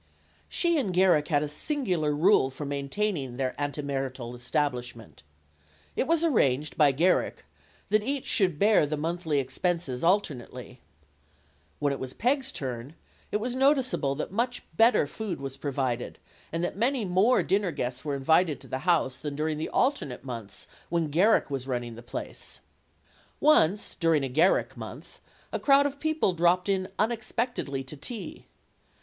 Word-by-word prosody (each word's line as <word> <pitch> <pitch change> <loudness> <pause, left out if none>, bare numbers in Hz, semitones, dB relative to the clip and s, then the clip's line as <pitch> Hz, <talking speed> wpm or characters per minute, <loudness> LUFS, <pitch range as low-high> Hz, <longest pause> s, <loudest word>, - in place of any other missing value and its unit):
She 340 -3 +1
and 205 -9 -1
Garrick 180 -5 +4
had 150 -3 +2
a - - -2
singular 180 - -1
rule 155 -1 +4
for 140 +2 -7
maintaining 140 -1 -2
their 130 -1 -1
antemarital 135 -4 -3
establishment. 125 -3 -3 0.7
It - - 0
was 330 0 +2
arranged 150 - +2
by 150 -3 +5
Garrick 170 +7 +1 0.4
that 215 +1 +3
each 275 +4 -2
should 180 -7 +1
bear 205 -4 +4
the 155 +1 -2
monthly 160 -1 -1
expenses 135 0 -2
alternately. 130 - -1 1.0
When 145 -1 0
it 135 - -5
was 130 0 -6
Peg's 265 +3 +1
turn, 130 +2 -5 0.4
it - - +2
was 240 +4 -3
noticeable 260 - +2
that 150 - -4
much 245 +4 -1
better 230 -6 +5
food 195 +4 -5
was 135 -1 -5
provided 130 -4 -2 0.3
and 165 +1 -2
that 175 - -2
many 240 +2 +1
more 190 +7 +3
dinner 195 -2 +1
guests 125 -3 -4
were 145 -2 -2
invited 155 +2 +2
to - - -12
the 130 - -3
house 145 -7 +2
than 145 -2 -5
during 155 +1 -1
the 155 - -3
alternate 260 - 0
months 115 -6 -7 0.2
when 165 -3 0
Garrick 185 +1 +3
was 135 -1 -3
run 125 -2 -1
ning 120 -1 -7
the 115 - -10
place. 120 - -7 0.8
Once, 210 - +4
during 165 -4 +2
a 135 - -2
Garrick 160 +9 +2
month, - - -10 0.3
a - - -1
crowd 280 0 +5
of 285 0 -3
people 315 -11 +1
dropped 175 +2 +2
in 190 -1 +1
unexpectedly 225 - -1
to 135 +3 -9
tea. 185 - -7
160 Hz, 155 wpm, -27 LUFS, 135-210 Hz, 1.0 s, by